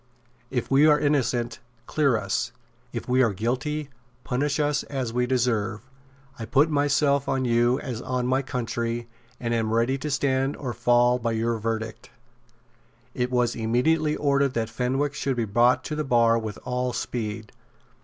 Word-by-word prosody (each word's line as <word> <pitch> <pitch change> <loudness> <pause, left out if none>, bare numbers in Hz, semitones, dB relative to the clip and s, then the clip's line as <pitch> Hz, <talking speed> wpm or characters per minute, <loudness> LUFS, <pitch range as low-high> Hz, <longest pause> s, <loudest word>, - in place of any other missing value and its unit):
"If 125 -1 -3
we 140 +3 +6
are 150 -1 +5
innocent, 125 -5 0 0.3
clear 140 -5 +2
us. 105 +4 -2 0.4
If 115 - -5
we 130 +1 +3
are 115 -5 +3
guilty, 135 +8 -2 0.3
punish 140 +3 -1
us 150 0 +1
as 130 -5 -3
we 125 0 +1
deserve. 115 -4 0 0.6
I 115 - -4
put 145 +6 +3
myself 145 -1 +2
on 135 -1 0
you 120 +2 +2
as 125 -5 -5
on 125 -1 -2
my 130 +2 +2
country, 120 -2 -3 0.3
and 120 -1 -2
am 110 -1 0
ready 120 +4 +1
to 150 +3 -4
stand 135 -1 0
or 125 -4 -4
fall 120 +1 +3
by 115 -1 -1
your 115 0 0
verdict." 115 0 -4 1.0
It 125 0 -1
was 125 -2 +1
immediately 150 +8 +1
ordered 140 -2 +1
that 115 -1 -1
Fenwick 135 +5 -1
should 135 -1 -1
be 120 -2 0
brought 120 +4 +3
to 155 - -4
the 155 - -1
bar 115 -3 +3
with 110 -3 -5
all 125 0 -1
speed. 110 -3 -4
125 Hz, 165 wpm, -25 LUFS, 115-140 Hz, 1.0 s, we